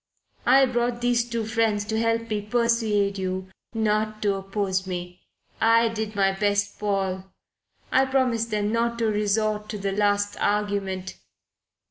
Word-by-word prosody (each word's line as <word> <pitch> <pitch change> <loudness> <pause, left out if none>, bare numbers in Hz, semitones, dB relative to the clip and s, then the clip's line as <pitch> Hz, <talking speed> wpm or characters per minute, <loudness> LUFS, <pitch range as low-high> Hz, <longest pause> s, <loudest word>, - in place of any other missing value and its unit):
I 265 +2 +7
brought 240 -1 -1
these 240 -1 +1
two 230 -2 -2
friends 220 -2 +1
to 220 +1 -1
help 230 0 0
me 210 -1 0
persuade 215 -3 +1
you 185 0 -3 0.3
not 215 0 0
to 205 -1 +2
oppose 195 -1 -2
me. 180 -1 -6 0.4
I 230 0 +5
did 220 -1 -4
my 195 -1 +3
best, 205 +1 0
Paul. 195 -2 -1 0.7
I 265 - +4
promised 255 -4 +1
them 210 -1 0
not 235 +1 0
to 230 - 0
resort 210 0 0
to 215 - -4
the 195 0 -2
last 205 0 +1
argument. 200 -2 -1
210 Hz, 145 wpm, -25 LUFS, 200-230 Hz, 0.7 s, I